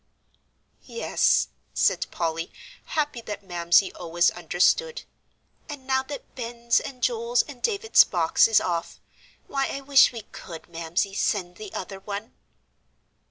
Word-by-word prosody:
"Yes," 470 - +1 0.3
said - - +2
Polly, 165 -1 -3 0.3
happy 295 -6 -2
that 210 -2 -7
Mamsie 175 +1 +2
always 170 0 +1
understood, 325 - +1 0.7
"and 285 -3 -8
now 265 0 +2
that 280 +2 -9
Ben's 235 -1 0
and 255 -2 -9
Joel's 235 0 +2
and 275 -5 -12
David's 445 0 +5
box 170 +1 +3
is 225 -2 +5
off, 170 -2 -3 0.5
why, 275 -1 -1
I 275 - -5
wish 275 0 +6
we 235 -2 -7
could, 165 -3 -10
Mamsie, 170 +4 -2
send 180 -3 -1
the 210 -3 -9
other 195 +1 -6
one." 205 +4 -6
215 Hz, 130 wpm, -25 LUFS, 175-265 Hz, 0.7 s, wish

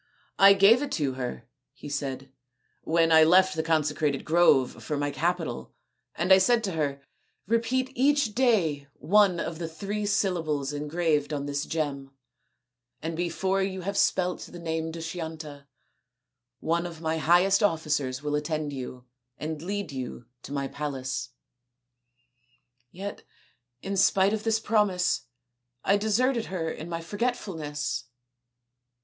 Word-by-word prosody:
" - - -32
I - - +9
gave 200 +6 +6
it 290 -1 -3
to 140 -5 0
her," 125 - -5 0.3
he - - -11
said, 135 -2 -4 0.3
" - - -45
when 165 -1 +4
I 160 0 +8
left 185 +3 +5
the 160 - 0
consecrated 150 -3 0
grove 155 -6 +3
for 150 - -2
my 145 0 -1
capital, 165 -5 -2 0.4
and 180 +3 +4
I 190 - +7
said 235 +4 +3
to 195 - -1
her, 140 -4 -2 0.2
' - - -45
Repeat 255 +3 0
each 275 -3 +2
day 185 - +2
one 190 +1 +3
of 165 -1 -4
the 165 - -3
three 205 +6 -4
syllables 160 -8 0
engraved 150 0 0
on 145 -1 -2
this 145 0 -3
gem, 145 -4 -3 0.9
and 165 +1 -4
before 185 +3 0
you 190 -1 -2
have 200 +3 -3
spelt 180 -2 +1
the 175 - -9
name 160 -1 -3
Dushyanta, 160 -3 -7 0.9
one 170 +2 0
of 165 -2 -10
my 160 0 -1
highest 180 +5 +4
officers 150 -8 0
will 150 0 -2
attend 150 0 -2
you 125 -1 -7 0.3
and 155 0 -5
lead 200 -1 -4
you 130 -3 -6 0.2
to - - -10
my 140 -1 -2
palace.' 130 -5 -4 1.6
Yet, 195 +7 -7 0.6
in 195 +1 -3
spite 195 +1 +4
of 220 0 -3
this 225 0 +2
promise, 205 - +1 0.6
I 200 - +3
deserted 225 +4 +1
her 165 -4 -3
in 160 +2 -7
my 165 -1 -3
forgetfulness." 170 -7 -3
165 Hz, 145 wpm, -27 LUFS, 145-195 Hz, 1.6 s, I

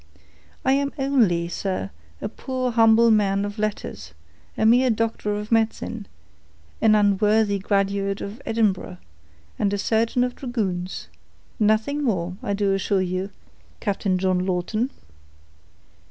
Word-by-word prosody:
I 265 - +4
am 280 0 +1
only, 235 -12 +2
sir, 185 - -3 0.3
a - - 0
poor 255 -2 -3
humble 225 0 +5
man 200 -2 +2
of 205 +1 -6
letters, 80 - -4 0.4
a - - +1
mere 250 +3 +5
doctor 220 -2 -1
of 210 +2 -5
medicine, 225 -1 0 0.7
an 220 -1 +5
unworthy 210 0 +3
graduate 195 0 0
of 210 +6 -7
Edinburgh, 210 - 0 0.6
and 200 - +1
a 205 - 0
surgeon 225 +4 +1
of 250 0 -2
dragoons; 190 -8 -3 0.5
nothing 220 +7 +2
more, 180 -7 -1
I 200 - -2
do 200 -1 +1
assure 195 0 +1
you, 185 +2 -2 0.5
Captain 195 -2 0
John 185 -1 +1
Lawton." 190 +7 -1
210 Hz, 125 wpm, -23 LUFS, 195-230 Hz, 0.7 s, humble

